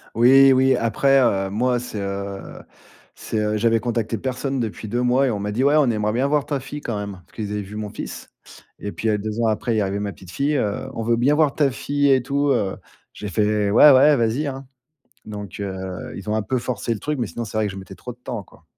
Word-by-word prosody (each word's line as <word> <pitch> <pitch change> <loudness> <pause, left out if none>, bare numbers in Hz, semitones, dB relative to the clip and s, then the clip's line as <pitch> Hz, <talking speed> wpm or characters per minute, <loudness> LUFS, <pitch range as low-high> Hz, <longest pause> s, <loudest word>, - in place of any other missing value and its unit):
Oui, 135 +3 +7
oui, 130 0 +4
après, 135 +4 +3
heu, 95 -6 +1
moi, 120 +4 +1
c'est, 120 -3 -6
heu, 100 0 -5 0.5
c'est, 110 - -3
heu 105 0 0
j'avais 115 +1 +2
contacté 115 -2 -2
personne 135 +2 -2
depuis 110 -1 -4
2 120 +4 -1
mois 125 +2 +3
et 130 - +1
on 105 - -2
m'a 105 +1 -3
dit: 120 +5 0
«Ouais, 145 +2 +4
on 150 -4 +4
aimerait 105 -2 0
bien 130 +4 +1
voir 145 -1 +1
ta 145 -2 -2
fille 135 +3 -8
quand 115 -7 -3
même». 100 -1 -5
Parce - - -29
qu'ils 105 -2 -4
avaient 105 0 -2
vu 100 +2 -10
mon 105 -1 -4
fils 105 - -8 0.5
et 100 - -5
puis, 110 - -2
heu, 105 - +2
2 110 +2 -4
ans 115 - +2
après, 110 +2 0
il - - 0
est - - +2
arrivé 100 0 -1
ma 100 0 -3
petite 90 - -15
fille. 140 +9 0
Heu: 105 0 -1
«On 115 - -4
veut 115 +1 +2
bien 125 +5 +3
voir 150 -2 +2
ta 145 -3 +2
fille 145 +2 +1
et 130 -1 +4
tout, 140 +3 0
heu». 105 -7 0 0.4
J'ai 105 - -7
fait: 105 +1 +1
«Ouais, 145 +7 +8
ouais, 140 +3 +6
vas-y, 120 +4 0
hein». 135 -1 -5 0.6
Donc, 105 -3 -8
heu, 95 -2 -5
ils 100 +2 -8
ont 105 - 0
un 110 - 0
peu 130 +4 -1
forcé 120 -2 -3
le - - -6
truc, 150 +5 -3
mais 115 - -1
sinon 120 - -5
c'est 110 - -7
vrai 110 -1 +2
que - - -6
je 95 - -8
mettais 95 0 -10
trop 125 - -9
de 120 - -20
temps, 125 -3 -5
quoi. - - -21
115 Hz, 260 wpm, -22 LUFS, 105-130 Hz, 0.6 s, Ouais